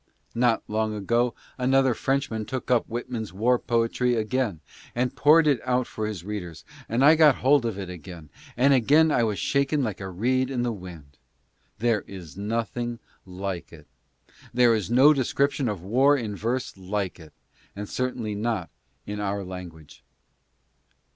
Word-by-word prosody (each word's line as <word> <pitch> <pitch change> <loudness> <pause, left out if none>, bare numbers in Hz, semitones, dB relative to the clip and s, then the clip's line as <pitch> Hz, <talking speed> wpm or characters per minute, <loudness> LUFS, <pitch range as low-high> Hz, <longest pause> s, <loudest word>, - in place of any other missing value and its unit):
Not 120 -1 +2
long 110 0 -1
ago 120 +3 0 0.2
another 130 0 +3
Frenchman 135 -4 -1
took 130 +1 -4
up 125 - +3
Whitman's 120 -1 -4
war 120 +6 +2
poetry 120 +1 +1
again, 110 -4 -1 0.4
and 125 +1 -1
poured 155 +3 +5
it 145 -4 +3
out 125 0 +1
for 110 -2 -4
his 100 -6 -5
readers, 90 -6 -6 0.2
and 120 +4 +2
I 150 - +8
got 155 -4 +6
hold 135 -2 +3
of 110 -4 -4
it 95 -2 -5
again, 85 -3 -10 0.3
and 135 +3 +5
again 150 +5 +4
I 125 - +2
was 110 -3 0
shaken 140 - +1
like 105 -5 -3
a 95 - -5
reed 125 +8 0
in 125 -3 -1
the 120 - 0
wind. 85 -8 -11 0.6
There 115 -2 +1
is 90 -7 -10
nothing 115 +3 -3 0.3
like 95 -1 -5
it. - - -14 0.4
T - - -30 0.2
lere 120 -1 +5
is 105 -6 -1
no 135 +5 +6
description 140 -1 0
of 100 -5 -5
war 135 +8 +4
in 110 -5 -4
verse 120 +5 -2
like 95 0 -3
it, 80 -2 -14 0.5
certainly 120 -2 -3
not 105 - -2 0.3
in 105 0 -5
our 100 -1 -2
language. 90 -5 -10
115 Hz, 160 wpm, -25 LUFS, 100-130 Hz, 0.6 s, I